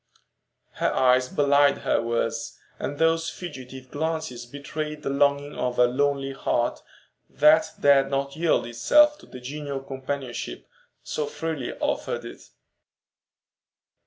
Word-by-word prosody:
Her - - 0
eyes 125 0 +3
belied 145 -1 +4
her - - +2
words, 115 0 -2 0.2
and 145 - -4
those 165 +1 +2
fugitive 130 -6 -9
glances 155 -6 -3
betrayed 150 +3 -6
the 135 - -1
longing 140 +1 +2
of 125 -1 -2
a 125 - +6
lonely 135 +2 0
heart 120 -3 -1 0.5
that 155 +1 +5
dared 135 -1 +5
not 140 0 -2
yield 165 -4 +2
itself 295 - +4
to - - -16
the 125 - -10
genial 140 +2 -5
companionship 135 - -5 0.4
so 150 -1 -3
freely 155 -3 -4
offered - - -2
it. - - -11
140 Hz, 125 wpm, -25 LUFS, 130-150 Hz, 0.5 s, a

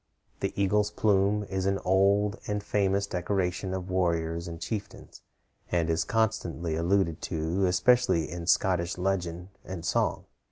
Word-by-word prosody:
The - - -1
eagle's 105 +1 +2
plume 105 0 +2
is 95 -1 -2
an 100 0 +1
old 100 +2 +3
and 105 0 -2
famous 100 -1 +1
decoration 95 0 -2
of 95 0 -4
warriors 85 -2 0
and 85 -1 -7
chieftains, 105 0 -6 0.5
and 85 -2 +1
is 80 0 0
constantly 90 -7 -1
alluded 85 0 +1
to, 85 +4 0
especially 90 -2 +3
in 85 -1 -6
Scottish 90 -1 +2
legend 90 -1 -2
and 90 -3 -7
song. - - 0
95 Hz, 135 wpm, -28 LUFS, 85-100 Hz, 0.5 s, old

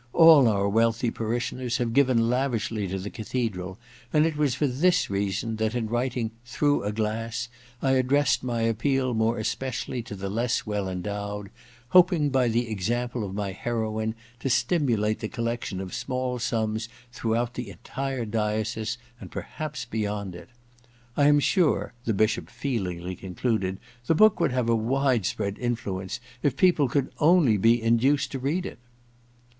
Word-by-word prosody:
All 160 -6 +8
our 100 -2 +2
wealthy 115 +2 +2
parishioners 120 +2 -2
have 120 -3 -1
given 125 -4 +4
lavishly 115 -5 0
to 95 +1 -3
the 95 +2 -5
cathedral, 100 -5 -3 0.3
and 155 0 +4
it 160 -2 0
was 145 -4 +1
for 145 - +1
this 165 - +2
reason 100 +3 -1
that, 110 +1 -1
in 120 -2 0
writing 120 0 -1
"Through 145 +1 +1
a 105 - 0
Glass," 115 +3 -2 0.3
I 135 - +3
addressed 135 +2 +3
my 120 -2 -1
appeal 130 +3 +1
more 110 +1 +1
especially 125 +3 -3
to 110 -2 -8
the 100 0 -5
less 115 +5 -1
well 105 -3 -2
endowed, 100 +2 -4 0.4
hoping 175 -4 +5
by 130 -2 +3
the 120 +1 +1
example 120 +3 -2
of 95 -1 -5
my 100 -1 -2
heroine 110 +1 -2 0.2
to 135 - -2
stimulate 120 -5 +1
the 110 - -3
collection 115 -5 -3
of 95 -1 -6
small 125 0 -2
sums 110 -2 -1 0.2
throughout 120 0 -1
the 125 -1 -5
entire 135 0 -4
diocese, 110 +1 -1 0.2
and - - -9
perhaps 150 -5 -5
beyond 105 -4 -3
it. 85 0 -11 0.7
I 145 - +4
am 145 0 +6
sure,' 170 +2 +2
the 115 - +1
Bishop 110 +2 +1
feelingly 95 -9 -3
concluded, 95 +1 -2 0.3
*the 165 - +3
book 215 +4 +5
would 170 - +2
have 125 -2 0
a 115 - +3
wide 125 -1 +1
spr^d 100 +1 -2
influence 100 -6 -3 0.2
if 135 -2 +1
people 160 -7 +4
could 140 +1 0
only 160 -7 +5
be 115 +4 +4
induced 120 +5 +2
to 135 - -4
read 155 +8 -1
it - - -7
115 Hz, 160 wpm, -26 LUFS, 105-130 Hz, 0.7 s, All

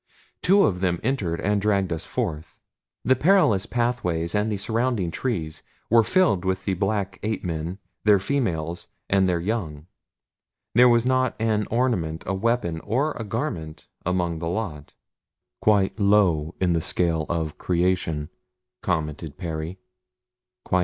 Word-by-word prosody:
Two 200 +2 +5
of 90 -3 +1
them 90 -2 0
entered 105 -10 -1
and 105 0 +1
dragged 100 -4 +1
us 80 - -5
forth. 75 0 -4 0.5
The 130 - +5
perilous 130 - +3
pathways 90 -9 -1
and 105 +1 +1
the 105 - -1
surrounding 110 -3 -1
trees 80 -9 -3 0.3
were 115 -1 +6
filled 150 - +2
with 95 0 -1
the 95 - +1
black 100 0 -1
ape 110 +1 -2
men, 85 +1 -3 0.3
their 105 -1 +6
females, 90 - -2 0.2
and 95 -1 +4
their 85 -1 +1
young. 85 -6 -3 0.9
There 125 +2 +7
was 120 0 +3
not 130 0 +2
an 110 -2 +1
ornament, 105 -10 0
a - - -1
weapon, 95 -5 0
or 130 - 0
a 115 - -5
garment 95 - -4 0.2
among 90 -2 -1
the 85 +1 -3
lot. 85 -7 -4 0.7
"Quite 100 -1 +2
low 95 -6 +3
in 90 -2 +2
the 85 - +1
scale 80 -2 0
of 80 -3 -2
creation," 85 -4 0 0.5
commented 80 -3 -2
Perry. 85 0 -4
95 Hz, 140 wpm, -24 LUFS, 85-110 Hz, 0.9 s, There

